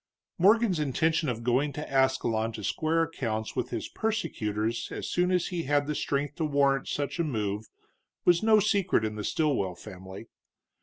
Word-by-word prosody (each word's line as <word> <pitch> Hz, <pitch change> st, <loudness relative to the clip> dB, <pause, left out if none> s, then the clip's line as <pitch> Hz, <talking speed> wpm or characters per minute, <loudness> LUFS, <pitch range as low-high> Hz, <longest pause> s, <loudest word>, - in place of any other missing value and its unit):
Morgan's 205 Hz, -1 st, +4 dB
intention 155 Hz, +2 st, +1 dB
of 115 Hz, -1 st, -3 dB
going 130 Hz, +5 st, +1 dB
to 150 Hz, -, -5 dB
Ascalon 130 Hz, -4 st, +1 dB
to 105 Hz, -, -7 dB
square 160 Hz, -, +1 dB
accounts 115 Hz, -9 st, -3 dB
with -, -, -2 dB
his -, -, -4 dB
persecutors 115 Hz, -, -2 dB
as -, -, -5 dB
soon 180 Hz, 0 st, +1 dB
as 180 Hz, -2 st, +1 dB
he 175 Hz, -2 st, -3 dB
had 145 Hz, +1 st, +2 dB
the 150 Hz, -, -2 dB
strength 145 Hz, 0 st, -2 dB
to 165 Hz, -, -1 dB
warrant 140 Hz, -2 st, +2 dB
such 145 Hz, +2 st, -3 dB
a -, -, +3 dB
move 105 Hz, -7 st, -2 dB, 0.6 s
was 175 Hz, -1 st, +5 dB
no 220 Hz, -1 st, +5 dB
secret 200 Hz, -, +2 dB
in 110 Hz, -, -2 dB
the 105 Hz, 0 st, -5 dB
Stilwell 130 Hz, -, 0 dB
family. 95 Hz, +1 st, -10 dB
145 Hz, 170 wpm, -28 LUFS, 110-165 Hz, 0.6 s, was